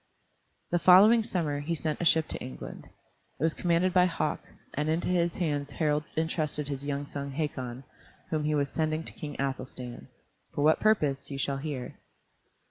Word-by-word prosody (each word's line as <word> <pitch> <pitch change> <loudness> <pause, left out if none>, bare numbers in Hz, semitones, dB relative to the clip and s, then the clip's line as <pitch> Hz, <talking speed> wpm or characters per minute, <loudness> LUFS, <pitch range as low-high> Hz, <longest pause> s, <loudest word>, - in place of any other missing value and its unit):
The 175 - +3
following 205 +7 +8
summer 160 -9 -1
he 160 +4 -2
sent 155 0 -2
a - - 0
ship 160 -1 +4
to - - -3
England. 65 -2 -8 0.5
It - - -2
was 160 0 +3
commanded 175 +1 +1
by 180 -1 +5
Hauk, 175 - -1 0.3
and 150 +2 -1
into 165 +3 0
his 175 -1 +1
hands 145 -5 -1
Harald 150 -1 0
intrusted 155 -2 -1
his 140 -1 -4
young 145 0 -2
son 140 -1 -5
Hakon, 130 -4 -3 0.5
whom 155 -2 0
he 150 0 +1
was 140 -1 +1
sending 155 +1 -1
to - - -7
King 150 -1 -7
Athelstan. 130 - -4 0.5
For 145 - +1
what 155 +1 +5
purpose 150 -11 +2
you 140 - -4
shall 135 0 -1
hear. 135 -3 -5
150 Hz, 175 wpm, -29 LUFS, 140-165 Hz, 0.5 s, following